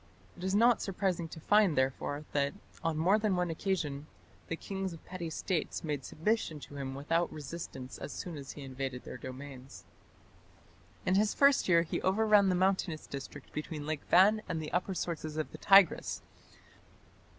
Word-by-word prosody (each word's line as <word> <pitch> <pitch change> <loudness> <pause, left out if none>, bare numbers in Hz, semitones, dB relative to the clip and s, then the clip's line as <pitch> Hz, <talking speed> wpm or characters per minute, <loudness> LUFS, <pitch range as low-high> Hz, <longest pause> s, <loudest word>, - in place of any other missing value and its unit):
It 180 - -10
is 190 +1 +1
not 235 +2 +5
surprising 185 -3 -1
to 160 - -9
find 205 -2 +4
therefore 135 +3 0
that, 140 +2 0 0.3
on 165 -1 0
more 185 +7 +4
than 210 -3 +1
one 180 -1 0
occasion, 155 -5 -2 0.4
the 165 - -2
kings 190 +1 -4
of 165 - -12
petty 180 -2 -5
States 160 +1 -2
made 145 -4 -2
submission 165 -1 -1
to 145 - -10
him 135 -1 -4
without 165 +5 0
resistance 140 -3 -7
as - - -6
soon 175 -3 -5
as 140 -2 -7
he 145 - -9
invaded 130 -1 -5
their - - -8
domains. 130 +1 -9 1.2
In 185 - +2
his 210 +2 +3
first 280 -7 +4
year 170 -2 +6
he 170 - -3
overran 205 0 +4
the 185 - +2
mountainous 185 -3 +1
district 140 -1 -8
between 150 -1 -4
Lake 155 -1 -2
Van 205 +4 +6
and 165 - -1
the 155 -1 -5
upper 185 +2 0
sources 155 -3 -3
of 155 - -2
the - - -10
Tigris. 195 -3 +5
165 Hz, 175 wpm, -32 LUFS, 145-190 Hz, 1.2 s, year